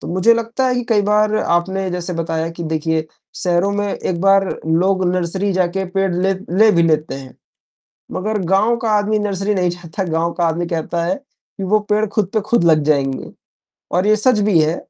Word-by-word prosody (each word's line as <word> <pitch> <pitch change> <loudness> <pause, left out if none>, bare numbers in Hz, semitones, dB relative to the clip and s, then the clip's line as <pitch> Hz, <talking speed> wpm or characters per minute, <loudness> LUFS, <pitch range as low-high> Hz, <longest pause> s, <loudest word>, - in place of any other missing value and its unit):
तो - - -8
मुझे 185 +7 +4
लगता 230 +3 -1
है 250 - +1
कि 245 -1 -2
कई 215 -3 +3
बार 210 +1 +2
आपने 190 +1 0
जैसे 180 0 -3
बताया 165 -1 -2
कि 170 +1 -8
देखिए 160 0 -1 0.4
शहरों 180 +2 +1
में 205 0 -1
एक 170 -2 -3
बार 195 0 +4 0.2
लोग 185 +4 +2
नर्सरी 185 +3 -1
जाके 185 +1 0
पेड़ 195 -1 +1
ले 190 +2 +1 0.3
ले 220 0 +7
भी 170 - +3
लेते 155 -2 +1
हैं, 135 -1 -10 0.8
मगर 215 +3 -2
गाँव 215 +5 +3
का 225 - 0
आदमी 210 0 +2
नर्सरी 205 0 -1
नहीं 180 -2 +1
जाता। 175 +2 -5
गाँव 165 +1 0
का 175 0 -1
आदमी 170 +1 0
कहता 170 0 -2
है 170 - 0
कि 280 -7 -15
वो 215 +3 +3
पेड़ 210 +1 +3
खुद 210 -1 -1
पे 215 - +2
खुद 215 -2 +1
लग 155 -2 +4
जाएँगे 140 -3 0 0.6
और 180 +3 +2
ये 215 - +5
सच 215 +1 +2
भी 200 -5 +3
है 155 +2 +1
185 Hz, 200 wpm, -18 LUFS, 170-210 Hz, 0.8 s, ले